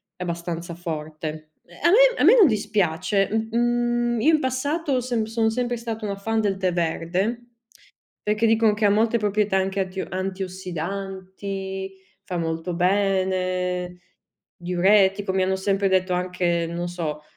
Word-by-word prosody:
è 180 - -6
abbastanza 170 0 -4
forte. 155 -2 -6 0.3
A 340 - +5
me - - +5
a - - +4
me - - +8
non 415 - +8
dispiace, 200 - +1
uhm, 220 +1 -1
mhmm, 240 0 +1
io 315 +7 +4
in 310 - +4
passato 275 +1 -1
sem 240 -3 -1
sono 225 0 0
sempre 245 +1 -1
stata 225 -1 -5
una 200 -1 -2
fan 225 +3 -1
del 200 -3 0
tè 185 -1 0
verde. 180 +8 -1 0.8
Perché 210 +2 +2
dicono 225 -1 +4
che 215 - -2
ha 205 - +5
molte 225 +3 +2
proprietà 210 -1 +1
anche 190 +1 0
attio 190 0 -3
antiossidanti, 190 +1 -5 0.3
fa 180 - -4
molto 165 +1 -3
bene, 185 -1 0 0.6
diuretico, 190 +2 +2
mi 190 0 +1
hanno 190 0 +1
sempre 195 +1 0
detto 185 -1 +1
anche 180 -1 0
non 170 +1 -4
so, 155 -4 -4
195 Hz, 150 wpm, -24 LUFS, 180-220 Hz, 0.8 s, me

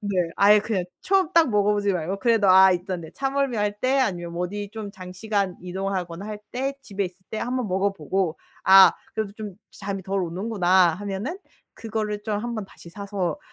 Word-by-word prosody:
네 200 -3 -3 0.2
아예 205 +1 +6
그냥 205 -5 -2 0.2
처음 380 -4 +2
딱 330 -5 +5
먹어보지 205 -1 +2
말고 180 +3 -2
그래도 225 -5 +3
아 190 0 +8
있던데 180 -2 -4
차멀미할 260 -7 -1
때 265 +2 +2
아니면 175 -9 -1
뭐 175 +1 -2
어디 205 +1 -6
좀 215 -2 -6
장시간 190 0 -3
이동하거나 185 -1 -4
할 210 -1 -6
때 270 +2 -2
집에 200 0 -3
있을 180 +1 -14
때 220 - -4
한번 250 -2 -2
먹어보고 190 -2 -1 0.3
'아 190 0 +9 0.2
그래도 215 -2 -3
좀 210 -4 -7 0.2
잠이 195 -1 -5
덜 195 +1 -1
오는구나.' 180 -1 +2
하면은 205 - -4 0.4
그거를 215 -2 -4
좀 210 -2 -2
한번 230 -2 -4
다시 170 - -15
사서 195 -4 -3
200 Hz, 350 characters per minute, -24 LUFS, 185-215 Hz, 0.4 s, 아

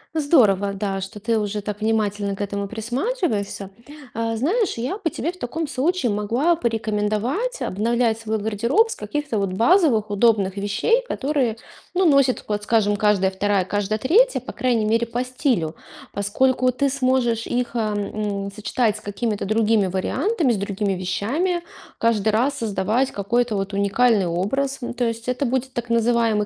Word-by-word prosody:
Здорово, 215 - +3
да, 195 -1 -2
что 195 +3 -7
ты 225 +1 0
уже 210 0 -2
так 210 0 -5
внимательно 205 -2 0
к 195 - -8
этому 200 0 -3
присматриваешься. 230 - -2 0.4
Э, 225 0 -1
знаешь, 365 - 0
я 255 - -3
бы 365 -5 -1
тебе 330 - -3
в 360 - -17
таком 315 +6 -3
случае 285 -1 0
могла 235 +11 +1
порекомендовать 225 - -1
обновлять 225 +2 0
свой 220 -1 -2
гардероб 235 - +1
с - - -3
каких-то 295 - -3
вот 195 -2 -1
базовых 230 - +3
удобных 205 -3 +2
вещей, 205 - +1
которые, 270 - -1 0.4
ну, 375 +1 +3
носит, 275 -5 +3
вот 210 -1 -1
скажем, 210 -1 +2
каждая 200 -2 +2
вторая, 195 0 0
каждая 205 +2 -1
третья, 430 - +3
по - - -8
крайней 240 -4 +1
мере, 230 +2 +1
по 240 +2 -2
стилю. 250 - -1 0.4
Поскольку 255 +5 +1
ты 275 +3 0
сможешь 255 -4 +1
их, 245 0 -2
эм, 210 -2 -2
м, - - -7
сочетать 220 0 0
с - - -12
какими-то 205 +1 -3
другими 215 -1 +2
вариантами, 270 - 0
с 225 - 0
другими 200 0 -1
вещами, 245 - -1 0.3
каждый 225 -2 +2
раз 255 +7 +1
создавать 220 +4 0
какой-то 225 +3 0
вот 195 0 -3
уникальный 200 0 +2
образ. 265 +11 -1
Ну, 240 - -4
то 245 0 -1
есть 230 0 -3
это 250 +3 0
будет 260 +1 -2
так 240 -2 -4
называемый 230 -2 +2
225 Hz, 160 wpm, -22 LUFS, 205-260 Hz, 0.4 s, Здорово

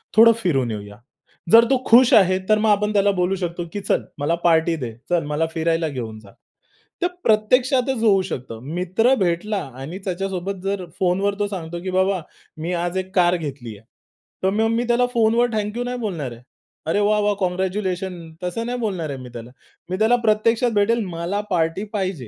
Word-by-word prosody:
थोडं 230 +1 +8
फिरून 135 -9 +1
येऊया. 105 -1 -7 0.5
जर 230 +1 +8
तो 260 -2 +2
खुश 250 +3 +6
आहे 185 -4 +5
तर 215 - +5
मग 220 0 +2
आपण 210 +1 +2
त्याला 200 -1 +3
बोलू 180 +2 +1
शकतो, 175 -1 -4
की 205 - -3
चल - - +1 0.2
मला 155 +4 +1
पार्टी 165 0 +3
दे. 125 -7 -5 0.2
चल 175 -1 +1
मला 150 +2 0
फिरायला 165 0 0
घेऊन 115 -6 -6
जा. 100 -2 -16 0.7
तर 355 - +3 0.2
प्रत्यक्षातच 250 +3 +2
होऊ 195 -3 +4
शकतो. 125 -9 -6
मित्र 180 - +1
भेटला 190 +2 0 0.2
आणि 165 +7 -6
त्याच्यासोबत 195 0 -3
जर 195 -2 -2
फोनवर 195 +2 +1
तो 205 - +1
सांगतो, 175 -3 -6
"की 190 - -3
बाबा 190 0 +1 0.4
मी 170 +3 -2
आज 175 +1 -2
एक 190 +1 -4
कार 175 -1 +4
घेतली 135 -9 -7
आहे." 110 - -21 0.6
तर 190 - +3
मग 220 +1 +2
मी 230 +1 +1
त्याला 240 +1 +3
फोनवर 230 +1 +3
थँकयू 215 +3 -2
नाही 250 0 -3
बोलणार 165 - -3
आहे. 120 - -11 0.5
अरे 165 +5 +1
वाह, 210 +1 +2
वाह! 205 0 +2
काँग्रॅच्युलेशन 185 0 -2 0.2
तसं 180 +6 -3
नाही 245 +1 -2
बोलणार 185 -9 -2
आहे 135 - -5
मी 125 -1 -9
त्याला. 120 0 -9 0.4
मी 185 - -2
त्याला 220 +3 +4
प्रत्यक्षात 225 +3 +2
भेटेल, 225 +2 +2
मला 175 +3 -3
पार्टी 165 +2 0
पाहिजे. 185 - -3
185 Hz, 185 wpm, -21 LUFS, 165-215 Hz, 0.7 s, थोडं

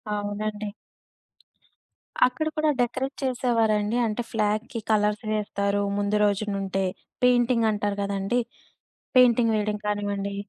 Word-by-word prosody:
అవునండి. 210 +1 -3 1.6
అక్కడ 310 +5 -3
కూడా 310 0 +2
డెకరేట్ 260 +3 -1
చేసేవారండి. 230 -4 +1
అంటే, 220 +2 -1
ఫ్లాగ్‌కి 215 +2 -1
కలర్స్ 210 0 +2
వేస్తారు 205 -1 -1 0.2
ముందు 205 +1 +1
రోజు 205 +1 +1
నుండే. 195 0 -1 0.4
పెయింటింగంటారు 230 -5 +2
కదండీ. 200 +4 0 0.8
పెయింటింగ్ 235 -2 +5
వెయ్యడం 210 0 0
కానివ్వండి. 205 -1 -2
210 Hz, 95 wpm, -25 LUFS, 205-240 Hz, 1.6 s, పెయింటింగ్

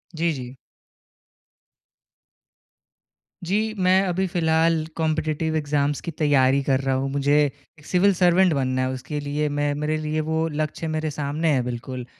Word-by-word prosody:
जी, 165 +1 +1
जी। 125 -2 -8 2.9
जी। 215 +4 0
मैं 185 +1 +5
अभी 185 +2 0
फ़िलहाल 160 -2 +2
कॉम्पिटिटिव 160 0 -1
एग्जाम्स 145 -1 0
की 170 - -5
तैयारी 140 -3 +3
कर 135 -1 +1
रहा 135 -1 0
हूँ। 135 +1 -1
मुझे 140 +1 +2
एक 145 +2 -10
सिविल 190 +2 +3
सर्वेंट 180 0 +4
बनना 130 -2 0
है 130 - 0
उसके 145 +3 -5
लिए 145 +1 -2
मैं 145 0 0
मेरे 150 +1 -1
लिए 155 0 -2
वो 160 0 0
लक्ष्य 155 +1 -3
मेरे 155 0 -2
सामने 150 +3 -1
है 130 - +2
बिल्कुल। 125 +1 -5
150 Hz, 150 wpm, -23 LUFS, 140-160 Hz, 2.9 s, मैं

